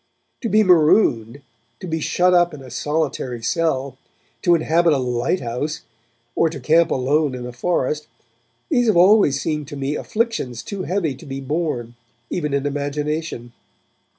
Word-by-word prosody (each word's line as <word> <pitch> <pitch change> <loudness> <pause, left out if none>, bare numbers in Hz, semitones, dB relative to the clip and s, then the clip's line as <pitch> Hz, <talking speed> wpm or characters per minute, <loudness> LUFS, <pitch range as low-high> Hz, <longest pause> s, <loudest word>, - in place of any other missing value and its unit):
To 235 - -2
be 215 +1 +4
marooned, 150 - +3 0.4
to 190 - -8
be 160 -2 -2
shut 180 +4 +2
up 175 -2 +3
in 135 - -11
a 130 - -12
solitary 135 -4 -2
cell, 140 -3 -1 0.4
to 175 -1 +4
inhabit 165 +1 +2
a - - +2
lighthouse, 125 +4 -2 0.5
or 165 - +2
to 155 - -7
camp 160 +6 +3
alone 140 +2 +1
in 125 -1 -6
a 125 - -6
forest, 150 0 -1 0.6
these 245 -7 +2
have 210 -5 +3
always 180 -6 +5
seemed 150 -2 -3
to 145 -1 -7
me 140 +2 -2
afflictions 215 - -2
too 195 -3 -5
heavy 175 -6 -1
to 130 - -13
be 135 0 -5
borne, 135 -4 -3 0.4
even 150 -4 -2
in 140 0 -1
imagination. 145 -3 -3
150 Hz, 155 wpm, -21 LUFS, 135-175 Hz, 0.6 s, always